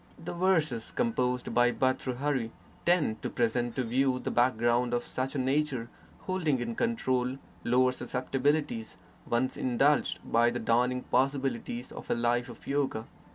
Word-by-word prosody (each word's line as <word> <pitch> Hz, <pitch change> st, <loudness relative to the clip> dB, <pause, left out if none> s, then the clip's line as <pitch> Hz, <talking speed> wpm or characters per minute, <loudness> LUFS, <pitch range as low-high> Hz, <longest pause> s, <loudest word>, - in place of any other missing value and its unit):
The -, -, -6 dB
verses 165 Hz, -10 st, +1 dB
composed 125 Hz, -, -1 dB
by 120 Hz, 0 st, +4 dB
Bhartrhari 130 Hz, -1 st, 0 dB, 0.4 s
tend 160 Hz, -11 st, +2 dB
to -, -, -2 dB
present 120 Hz, 0 st, 0 dB
to 130 Hz, -, 0 dB
view 130 Hz, +2 st, +1 dB
the -, -, -3 dB
background 120 Hz, 0 st, +2 dB
of 120 Hz, -, -1 dB
such 130 Hz, +2 st, -3 dB
a -, -, 0 dB
nature 135 Hz, -2 st, 0 dB, 0.3 s
still -, -, -23 dB
holding 165 Hz, -8 st, 0 dB
in 120 Hz, -1 st, -3 dB
control 130 Hz, -, 0 dB, 0.3 s
lower 125 Hz, +1 st, +3 dB
susceptibilities, 130 Hz, -1 st, -1 dB, 0.3 s
once 125 Hz, +2 st, 0 dB
indulged, 135 Hz, +4 st, +2 dB
by 120 Hz, +1 st, +3 dB
the 120 Hz, -, -3 dB
dawning 125 Hz, +2 st, +1 dB
possibilities 130 Hz, -2 st, -1 dB
of -, -, -9 dB
a -, -, +2 dB
life 120 Hz, +1 st, +1 dB
of -, -, -12 dB
yoga. 135 Hz, -5 st, -1 dB
125 Hz, 150 wpm, -29 LUFS, 120-140 Hz, 0.4 s, by